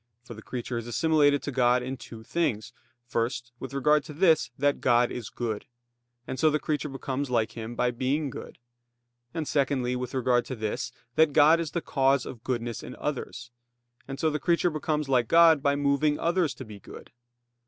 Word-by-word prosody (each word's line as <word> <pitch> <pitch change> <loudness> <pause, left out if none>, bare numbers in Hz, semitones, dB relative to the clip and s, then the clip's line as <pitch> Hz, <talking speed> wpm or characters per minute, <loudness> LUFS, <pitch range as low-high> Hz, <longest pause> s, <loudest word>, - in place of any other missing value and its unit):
For 120 - -10
the 110 - -11
creature 120 0 -4
is 115 - -8
assimilated 145 +2 +3
to 145 - -3
God 125 -1 +3
in 130 +2 -4
two 115 -3 -11
things; 125 -6 -2 0.3
first, 120 0 -2
with 130 - -7
regard 150 +2 +2
to 150 - -8
this, 160 - +3
that 145 +1 +1
God 120 -1 +3
is 115 -4 -6
good; 110 -3 -4 0.6
and 130 - -5
so 160 - +5
the 150 - +1
creature 150 0 -2
becomes 135 0 -4
like 115 -3 +1
Him 115 0 -7
by 125 - +1
being 135 +4 -1
good; - - -9 0.7
and 155 +1 -4
secondly, 130 -3 0
with 125 +1 -4
regard 125 -1 +2
to 130 - -5
this, 110 -2 -3 0.3
that 160 -2 +4
God 155 +4 +6
is 165 -2 -2
the 170 - -3
cause 135 -3 +2
of 120 -3 -9
goodness 120 -2 -3
in - - -9
others; 125 -4 -5 0.6
and 135 0 -6
so 160 +1 +2
the 150 - -2
creature 170 +1 +2
becomes 150 -1 -2
like 125 -4 +2
God 165 -1 +6
by 140 0 +2
moving 145 +1 +1
others 170 -5 0
to - - -8
be 105 -2 -11
good. - - -12
135 Hz, 195 wpm, -27 LUFS, 120-150 Hz, 0.7 s, God